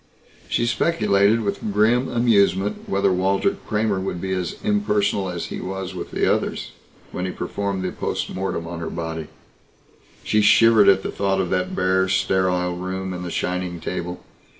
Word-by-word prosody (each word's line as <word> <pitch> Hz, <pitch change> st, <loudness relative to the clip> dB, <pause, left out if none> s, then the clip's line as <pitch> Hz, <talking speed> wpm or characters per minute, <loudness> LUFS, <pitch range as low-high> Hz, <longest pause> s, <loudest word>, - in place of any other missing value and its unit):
She 120 Hz, -, +1 dB
speculated 110 Hz, -5 st, +2 dB
with 100 Hz, -2 st, -2 dB
grim 115 Hz, +5 st, +3 dB
amusement 105 Hz, -4 st, +2 dB
whether 95 Hz, -1 st, +2 dB
Walter 95 Hz, +2 st, +1 dB
Kramer 105 Hz, -2 st, 0 dB
would 95 Hz, -2 st, -3 dB
be 95 Hz, +1 st, -4 dB
as 90 Hz, -2 st, -2 dB
impersonal 105 Hz, -2 st, +1 dB
as 85 Hz, -2 st, -4 dB
he -, -, -5 dB
was 95 Hz, 0 st, -5 dB
with -, -, -6 dB
the -, -, 0 dB
others, -, -, -1 dB, 0.4 s
when 90 Hz, -, -3 dB
he 95 Hz, -, -2 dB
performed 100 Hz, -1 st, -3 dB
the 90 Hz, -, -2 dB
post -, -, -3 dB
mortem 95 Hz, -3 st, -3 dB
on 85 Hz, 0 st, -6 dB
her 85 Hz, -, -4 dB
body. 80 Hz, -2 st, -5 dB, 1.0 s
She 105 Hz, -, +2 dB
shivered 110 Hz, 0 st, +6 dB
at 95 Hz, 0 st, +4 dB
the -, -, -3 dB
thought 95 Hz, -1 st, 0 dB
of 95 Hz, -2 st, -1 dB
that 90 Hz, -1 st, -1 dB
bare 95 Hz, 0 st, +2 dB
sterile 95 Hz, -2 st, +1 dB
room 95 Hz, +1 st, -4 dB
and 90 Hz, 0 st, -5 dB
the 90 Hz, -, -4 dB
shining 90 Hz, 0 st, -2 dB
table. 90 Hz, +1 st, -5 dB
95 Hz, 170 wpm, -22 LUFS, 90-105 Hz, 1.0 s, shivered